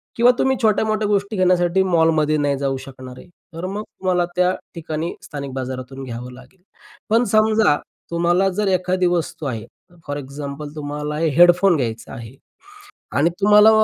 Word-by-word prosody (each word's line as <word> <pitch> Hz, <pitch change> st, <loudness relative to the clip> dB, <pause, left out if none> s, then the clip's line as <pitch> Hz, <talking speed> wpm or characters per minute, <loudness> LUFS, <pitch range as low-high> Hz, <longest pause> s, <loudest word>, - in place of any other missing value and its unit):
किंवा 240 Hz, +1 st, +6 dB
तुम्ही 265 Hz, 0 st, +2 dB
छोट्या-मोठ्या 215 Hz, -1 st, +1 dB
गोष्टी 205 Hz, +1 st, 0 dB
घेण्यासाठी 180 Hz, 0 st, +3 dB
मॉलमध्ये 160 Hz, -4 st, +2 dB
नाही 145 Hz, -1 st, 0 dB
जाऊ 135 Hz, -1 st, -1 dB
शकणार 130 Hz, -1 st, -10 dB
आहे. -, -, -13 dB, 0.3 s
तर 165 Hz, +3 st, -5 dB
मग 200 Hz, +3 st, -4 dB
तुम्हाला 180 Hz, -4 st, -1 dB
त्या 180 Hz, 0 st, +3 dB, 0.2 s
ठिकाणी 160 Hz, 0 st, -4 dB
स्थानिक 140 Hz, -3 st, -6 dB
बाजारातून 130 Hz, +1 st, -6 dB
घ्यावं 125 Hz, 0 st, -7 dB
लागेल. 180 Hz, +9 st, -16 dB, 0.5 s
पण 230 Hz, +2 st, +4 dB
समजा 215 Hz, -5 st, +4 dB, 0.4 s
तुम्हाला 175 Hz, +3 st, +2 dB
जर 200 Hz, +2 st, -1 dB
एखादी 185 Hz, 0 st, +1 dB
वस्तू 170 Hz, -3 st, -2 dB
आहे, 115 Hz, -4 st, -4 dB, 0.4 s
फॉर 145 Hz, 0 st, -3 dB
एक्झाम्पल 140 Hz, +1 st, -7 dB
तुम्हाला 150 Hz, 0 st, -4 dB
हेडफोन 175 Hz, +4 st, +5 dB
घ्यायचा 115 Hz, -3 st, -4 dB
आहे 115 Hz, +2 st, -9 dB, 0.8 s
आणि 160 Hz, +4 st, +3 dB
तुम्हाला 210 Hz, +2 st, +7 dB
165 Hz, 145 wpm, -20 LUFS, 140-190 Hz, 0.8 s, तुम्हाला